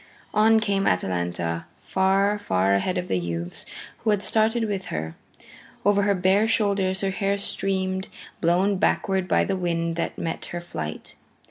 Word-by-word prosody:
On 220 +1 +5
came 200 -2 0
Atalanta, 85 -2 -1 0.2
far, 195 +2 +2
far 95 - +1
ahead 140 - +1
of 180 - -2
the 90 - 0
youths 85 0 -1 0.3
who 225 - -1
had 210 -1 +2
started 225 +1 +2
with 200 -3 -2
her. 80 +1 -4 0.7
Over 205 0 +4
her 200 0 +2
bare 190 +4 +3
shoulders 200 -4 +1
her 195 -1 0
hair 200 0 0
streamed, 190 -1 -2 0.3
blown 185 +4 +2
backward 190 -1 +1
by - - +3
the 195 - -1
wind 170 -2 -1
that 170 - -2
met 165 - -4
her 175 - -5
flight. 80 - -6
190 Hz, 155 wpm, -24 LUFS, 165-200 Hz, 0.7 s, On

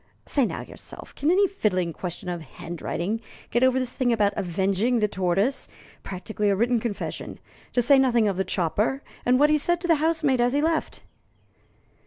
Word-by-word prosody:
Say 275 -5 +2
now - - -5
yourself, - - -11
can 295 - -1
any 390 +3 +4
fiddling 185 - -1
question 180 +1 -6
of 175 -1 -3
handwriting 175 - -4 0.3
get 240 - +2
over 260 0 +4
this 255 -1 -2
thing 250 -2 +1
about 210 -3 +2
'avenging 195 +5 0
the 210 -2 +2
tortoise' 195 +7 0 0.3
practically 205 +2 -3
a 200 - +3
written 235 +3 +2
confession 220 -3 -5 0.3
to 245 - +2
say 275 +3 +6
nothing 240 -4 +3
of 200 - 0
the 190 - 0
chopper, 205 - -1 0.2
and 250 +1 +4
what 295 +1 +5
he 305 - +4
said 345 +4 +1
to 350 - -3
the 330 -2 +4
housemaid 310 -6 +2
as 245 +1 +2
he 285 - +2
left?" 325 0 -1
235 Hz, 185 wpm, -25 LUFS, 190-270 Hz, 0.3 s, say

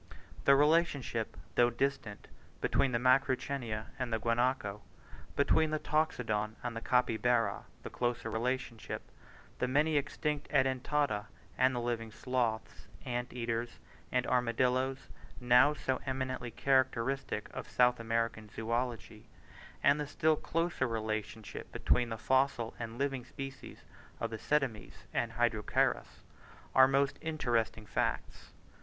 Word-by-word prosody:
The 140 - +7
relationship, 145 -6 +2 0.2
though 120 0 +5
distant, 120 -4 -2 0.3
between 140 -2 +2
the 120 - +2
Macrauchenia 130 -3 +1
and 125 -2 -2
the 110 - +2
Guanaco, 115 -2 0 0.5
between 155 +2 +3
the 155 - 0
Toxodon 115 -9 0
and 120 -1 -3
the 115 - -4
Capybara, 120 -1 +1 0.2
the - - -7
closer 120 -2 -1
relationship 120 0 -3
between - - -23
the 125 - +1
many 150 +4 +2
extinct 150 +1 -2
Edentata 130 -4 +1 0.3
and 130 0 +3
the - - 0
living 120 -2 -2
sloths, 120 -2 -2 0.2
ant 120 0 -3
eaters, 115 -1 -3 0.3
and 125 0 +1
armadillos, 125 +2 +1 0.3
now 125 +3 +6
so 130 -3 -2
eminently 130 -2 -2
characteristic 130 +1 0
of - - -6
South 125 0 +3
American 115 -1 -1
zoology, 115 -2 -3 0.5
and 140 +1 +5
the 150 - -2
still 155 +2 +2
closer 165 -3 -1
relationship 110 -2 -4
between 120 -1 +1
the 115 - -3
fossil 130 -2 +1
and 115 0 -5
living 135 -2 -1
species 135 +1 -9 0.4
of 115 - -2
Ctenomys 110 - -2
and 115 -1 -1
Hydrochaerus, 115 -3 0 0.5
are 130 0 +8
most 140 +1 +1
interesting 120 -8 -1
facts. 100 - -2
125 Hz, 125 wpm, -32 LUFS, 115-135 Hz, 0.5 s, are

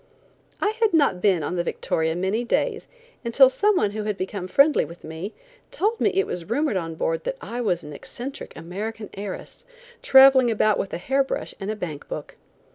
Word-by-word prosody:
I 410 - +2
had 435 -6 +3
not 275 - +3
been 185 -6 +3
on 180 +5 -3
the 175 - +1
Victoria 160 -1 -1
many 190 +6 -1
days 435 - -1 0.4
until 255 +3 +5
some 415 +8 +2
one 210 - +2
who 215 +1 -4
had 210 -2 -2
become 190 -1 -4
friendly 280 +10 +4
with 170 +1 -11
me, 160 +6 -6 0.4
told 455 -2 -1
me - - +4
it 390 - +3
was 175 +1 -6
rumored 290 0 +1
on 165 -3 -3
board 165 0 -1
that - - -3
I 245 - -5
was 180 -7 0
an 150 - -9
eccentric 245 - -8
American 205 +6 -6
heiress, 200 - -7 0.4
traveling 265 -2 +7
about 215 -1 +2
with 195 - -3
a - - -3
hair 270 +10 +1
brush 270 - -4
and 195 - -4
a 215 - -1
bank 160 -8 -6
book. - - -6
215 Hz, 200 wpm, -24 LUFS, 180-270 Hz, 0.4 s, traveling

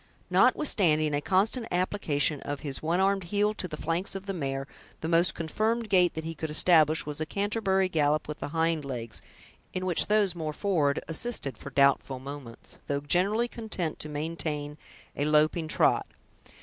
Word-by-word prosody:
Notwithstanding 155 - +3
a 145 - 0
constant 215 - +1
application 165 -6 0
of 145 -1 -5
his 140 -3 -4
one 165 +3 0
armed 195 -1 +1
heel 205 +3 +1
to 185 - -4
the 155 -3 -7
flanks 170 +5 -2
of 195 0 -6
the 195 - -3
mare, 135 -5 -3 0.4
the 160 - -3
most 170 +1 +3
confirmed 215 +7 -1
gait 180 -3 +3
that 160 - -4
he 165 +1 -4
could 160 0 -5
establish 155 0 +4
was 150 0 -5
a - - 0
Canterbury 200 -2 0
gallop 155 -3 +1
with 150 - -6
the - - -4
hind 160 0 0
legs, 120 -5 -6 0.5
in 185 0 -3
which 180 -3 +2
those 210 -3 +3
more 160 -3 -4
forward 150 -6 0
assisted 165 - -2
for 140 - -9
doubtful 140 -1 +2
moments, 135 -3 -9
though 140 0 -1
generally 195 +10 +1
content 215 -9 -4
to 155 - -3
maintain 150 -1 -4 0.4
a 145 - -1
loping 155 +2 +2
trot. - - +2
160 Hz, 175 wpm, -28 LUFS, 145-190 Hz, 0.5 s, establish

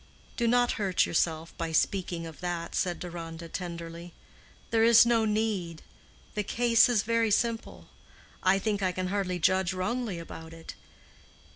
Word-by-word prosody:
"Do 235 - 0
not 245 +1 +3
hurt 190 -3 +2
yourself 165 0 -1
by 165 -1 -2
speaking 175 0 0
of 160 -2 -10
that," 175 -2 -4
said 175 -2 0
Deronda, 170 -1 -7
tenderly. 170 0 -7 0.6
"There 225 -1 +3
is 230 0 +7
no 230 -2 +3
need; 210 -6 -1 0.5
the 210 - -1
case 230 +3 +3
is 225 -5 +2
very 230 0 +1
simple. 210 - -1 0.5
I 185 +1 +4
think 205 0 -1
I 185 -1 0
can 185 0 -3
hardly 190 -2 -1
judge 185 +2 +2
wrongly 200 +2 -2
about 165 -1 -9
it. 165 0 -9
185 Hz, 150 wpm, -28 LUFS, 170-225 Hz, 0.6 s, is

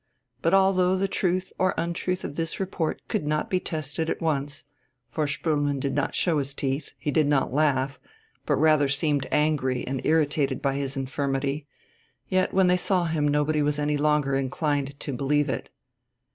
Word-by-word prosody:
But 165 +4 +3
although 190 -1 +4
the 195 +1 0
truth 185 -1 -1
or 185 0 +2
untruth 170 +2 -2
of - - -5
this 165 0 -3
report 185 -4 -2
could - - -1
not 150 +1 -1
be 185 - +2
tested 160 -1 -3
at - - -2
once 145 -3 -2 0.5
for 155 -2 0
Spoelmann 145 -1 0
did 135 0 -2
not 145 - -1
show 165 -4 +2
his 140 0 -3
teeth, 140 +1 -3
he 145 - -2
did 155 -1 +3
not 140 -3 +1
laugh, 135 -3 +1 0.5
but - - +3
rather 155 -1 +4
seemed 140 0 0
angry 145 -4 +1
and 130 0 -3
irritated 145 -3 +1
by 140 -1 0
his 135 0 -2
infirmity 135 +2 -2 0.6
yet 185 0 +2
when 190 0 +4
they 180 0 +4
saw 180 -1 +1
him 160 -3 0
nobody 150 +1 +1
was 145 0 +1
any 150 0 0
longer 150 -1 +2
inclined 140 +1 -1
to 140 - -4
believe 145 +3 +1
it. - - -3
150 Hz, 175 wpm, -26 LUFS, 140-165 Hz, 0.6 s, although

